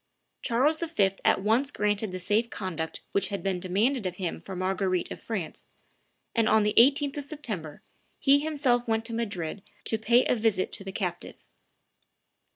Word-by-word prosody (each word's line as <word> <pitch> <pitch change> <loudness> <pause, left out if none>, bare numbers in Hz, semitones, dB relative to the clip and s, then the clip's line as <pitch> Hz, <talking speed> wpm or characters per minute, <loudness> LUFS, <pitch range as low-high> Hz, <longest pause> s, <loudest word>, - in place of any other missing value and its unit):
Charles 280 +7 +2
V. 315 - +2
at 190 - +3
once 235 +6 +2
granted 210 -4 -1
the 185 - -4
safe 210 +5 +1
conduct 165 -7 -4
which 200 -1 +1
had 200 -1 -4
been 190 -2 0
demanded 205 +6 +1
of 180 - -5
him 180 -2 -3
for 190 - -8
Marguerite 185 0 -1
of - - -7
France, 195 -8 -5 0.7
and 225 -1 +2
on 220 -1 +5
the 210 - +1
18th 280 +4 +4
of 290 - -4
September 210 - -6 0.3
he 280 0 +5
himself 280 -6 +1
went 225 0 0
to 230 - -5
Madrid 205 -6 -3 0.2
to 225 - 0
pay 235 +3 +4
a - - +2
visit 215 -5 +1
to - - -2
the 195 - -6
captive. 180 -3 -4
215 Hz, 170 wpm, -28 LUFS, 190-245 Hz, 0.7 s, on